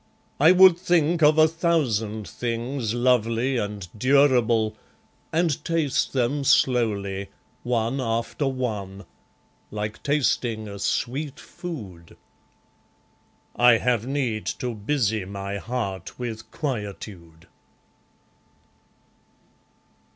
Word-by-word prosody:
I 155 +5 +7
would 185 -1 +7
think 175 -2 +2
of 150 +1 +5
a 155 0 +7
thousand 125 - -1
things, 120 0 -3
Lovely 120 +1 +1
and 105 -4 -4
durable, 120 -3 +3 0.6
and 165 -3 0
taste 165 -5 0
them 135 +2 0
slowly, 105 -8 +1 0.3
One 120 +2 -1
after 115 +4 -1
one, 105 -7 -4 0.6
like 105 +1 -5
tasting 120 -6 0
a 100 -1 -8
sweet 140 +8 -2
food. 100 - -9 1.4
I 120 0 +6
have 120 0 +1
need 130 -6 -2
to 125 -1 -3
busy 110 -1 -1
my 100 +1 -5
heart 100 -4 -4
with 110 -3 -6
quietude. 100 - -6
120 Hz, 90 wpm, -24 LUFS, 105-140 Hz, 1.4 s, I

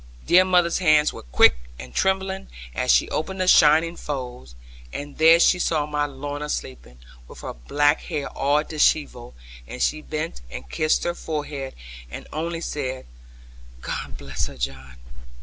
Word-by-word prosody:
Dear 185 +1 +6
mother's 175 -2 +3
hands 155 -4 +4
were - - -9
quick - - +5 0.2
and 65 0 -10
trembling, 190 - 0 0.3
as - - -2
she 60 - +4
opened 190 +4 -3
the 185 - 0
shining 160 0 +5
folds; 125 - -6 0.4
and 145 0 -7
there 165 +1 +7
she 180 +1 +4
saw 155 -4 +1
my 150 0 -1
Lorna 145 +2 -6
sleeping, 60 - -6 0.3
with - - -12
her - - -6
black 145 - +1
hair 150 -5 -3
all 145 +2 +1
dishevelled, 150 - 0 0.3
and - - -8
she 155 - 0
bent 150 - -5
and 65 +1 -8
kissed 155 - +1
her 175 - -1
forehead, 150 -5 -5 0.3
and - - -8
only 165 +2 -3
said, 130 -5 -4 0.8
'God - - -5
bless 70 -3 -4
her, - - -11
John!' 65 0 -5
150 Hz, 155 wpm, -23 LUFS, 120-165 Hz, 0.8 s, there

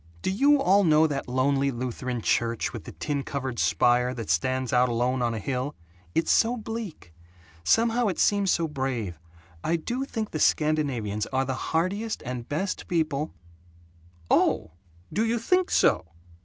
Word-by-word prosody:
Do - - 0
you 280 +8 +4
all 200 -5 +4
know 155 -2 +5
that 145 -3 -2
lonely 135 +2 +1
Lutheran 125 -1 -3
church, 115 -1 0
with - - -7
the - - -7
tin 145 -1 -2
covered 135 -3 -4
spire, 125 +1 +2
that 115 -9 -3
stands 130 +10 0
out 125 0 +4
alone 125 +2 0
on 120 -1 0
a - - -3
hill? 130 +6 -3 0.4
It's 165 - +2
so 235 +2 +3
bleak; 220 - -7 0.5
somehow 230 - +3
it 190 - -1
seems 200 -2 +2
so 170 -2 +2
brave. 130 - -3 0.4
I 165 - +1
do 240 +11 -2
think 225 -5 -4
the 155 - -3
Scandinavians 135 -11 +1
are 135 0 0
the 130 - -2 0.2
hardiest 195 +7 -1
and 125 -1 -5
best 185 +7 -2
people 155 -3 -1 0.5
" 85 0 -18
"Oh, - - 0 0.4
do 215 - +1
you 230 +1 +1
THINK 365 +11 +1
so?" - - +3
140 Hz, 165 wpm, -26 LUFS, 125-190 Hz, 0.5 s, know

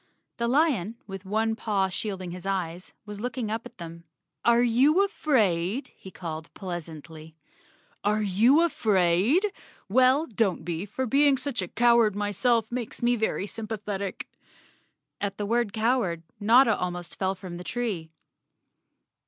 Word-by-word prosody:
The 235 - 0
lion, 245 - +2
with 195 -1 -8
one 220 +3 0
paw 205 -4 0
shading 190 -2 -4
his 180 +2 -7
eyes, 180 -2 -3
was 210 -1 -8
looking 245 -2 -3
up 225 +1 -3
at - - -23
them. 170 -1 -9 0.4
"Are 235 0 +4
you 275 +11 +4
afraid?" 220 - 0
he 190 - -12
called 160 -3 -7
pleasantly. 160 -3 -8 0.7
"Are 210 +1 +1
you 230 - +4
afraid? 220 - +2 0.3
Well, 255 +7 +4
don't 205 - -1
be, 175 +3 -3
for 260 +6 -3
being 275 +3 +4
a 210 -10 -2
coward 235 -1 +3
myself 210 +3 +1
makes 240 -1 -5
me 240 +1 +3
very 220 -3 -1
sympathetic." 210 -3 -5 0.9
At 200 -1 -2
the 205 - -2
word 235 0 +1
cow¬ 230 +5 +2
ard 170 -7 -3 0.2
Notta 225 +2 +5
almost 175 -1 -5
fell 190 0 0
from 180 -2 -8
the 175 - -8
tree. 205 -8 -3
210 Hz, 140 wpm, -26 LUFS, 185-240 Hz, 0.9 s, Notta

